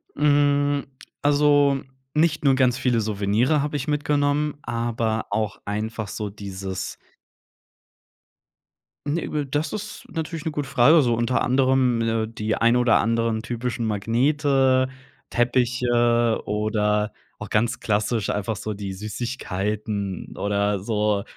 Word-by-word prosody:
Hm, 145 -1 +2 0.4
also, 145 -1 +4 0.3
nicht 160 0 +2
nur 135 -2 +4
ganz 130 -2 +3
viele 125 -3 +1
Souvenirs 110 +7 +1
habe 145 0 -2
ich 140 +1 -5
mitgenommen, 145 0 +1
aber 115 -1 -2
auch 105 0 -2
einfach 110 +1 -3
so 105 -1 -4
dieses 95 -2 -6 2.1
ne, 155 +4 -1
w 150 -1 -1
das 145 +3 -2
ist 215 0 -6
natürlich 165 0 -4
'ne 160 - -1
gute 145 -2 -4
Frage, 140 +5 +6
so 120 -4 +2
unter 120 +2 0
anderem, 130 -1 +3
ne, 115 -1 0
die 110 -1 -2
ein 115 +1 +3
oder 125 -1 +4
anderen 115 -1 0
typischen 120 0 -3
Magnete, 130 +4 +2 0.4
Teppiche 120 -1 +2
oder 105 0 0 0.3
auch 105 - -7
ganz 115 +2 +1
klassisch 105 +1 0
einfach 105 +2 -1
so 105 +2 -4
die 100 -1 -5
Süßigkeiten 105 -2 -4
oder 100 0 0
so 105 0 0
120 Hz, 125 wpm, -23 LUFS, 105-140 Hz, 2.1 s, Frage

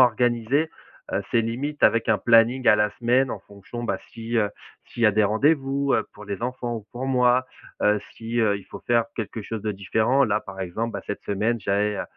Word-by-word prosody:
organiser, 125 +4 +3 0.4
heu, - - 0
c'est 115 - +3
limite 135 +7 -4
avec 115 0 +4
un 110 -2 +4
planning 120 +2 +4
à 105 - +7
la 105 0 +2
semaine 125 +2 +2
en 105 - -5
fonction, 100 +5 -9
bah, - - -1
si, 115 +1 -4
heu, 105 -2 +1 0.3
s'il 120 - -6
y - - +8
a 105 - +6
des 105 0 +3
rendez-vous, 135 +4 +2
heu, - - 0
pour 105 - -12
les 100 -1 -5
enfants 120 -1 -3
ou 105 -2 -9
pour 125 +2 -4
moi, 125 -1 +3 0.4
heu. 105 0 +4 0.2
Si, 115 +1 -4
heu, 105 -3 +3
il 100 - -14
faut - - -10
faire 120 -1 +3
quelque 110 0 -4
chose 110 0 -5
de 105 - -1
différent. 110 +7 +2
Là, 105 -2 +1
par 95 -2 -9
exemple, 110 +6 -3
bah, 100 - -4
cette 105 - -5
semaine, 110 +3 0
j'avais, 100 +1 0
heu, - - -1
115 Hz, 220 wpm, -24 LUFS, 105-125 Hz, 0.4 s, y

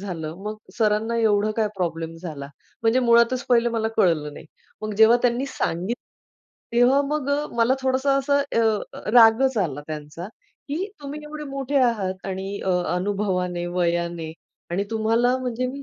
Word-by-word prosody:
झालं. 165 -5 -5
मग 215 +1 -4 0.2
सरांना 220 +1 +1
एवढं 215 -2 +2
काय 220 -1 +1
प्रॉब्लेम 165 -2 -3
झाला, 155 -5 -7 0.3
म्हणजे 230 +3 +3
मुळातच 235 +2 +3
पहिले 240 -1 +4
मला 225 -1 -1
कळलं 165 -7 +2
नाही. - - -11 0.4
मग 215 0 -3
जेव्हा 220 +2 +7
त्यांनी 245 +2 +1
सांगितलं, 225 -4 -3 0.7
तेव्हा 250 +3 +5
मग 295 -2 -2
अ, 290 +1 0
मला 235 +3 +3
थोडंसं 265 +1 +2
असं 280 +1 +2 0.2
अ, 215 -2 -2
रागच 240 +2 +6
आला 155 -8 -1
त्यांचा, 155 +3 -7 0.4
की 315 +7 -2 0.2
तुम्ही 290 +1 -6
एवढे 300 0 -7
मोठे 275 0 -3
आहात 195 -6 -1
आणि 195 +1 -4
अ, 190 - +1 0.2
अनुभवाने, 180 -2 -1
वयाने 170 -2 -1 0.4
आणि 195 +3 -1
तुम्हाला 230 +3 +2
म्हणजे 250 0 -2
मी 275 +2 -6
220 Hz, 150 wpm, -23 LUFS, 180-255 Hz, 0.7 s, जेव्हा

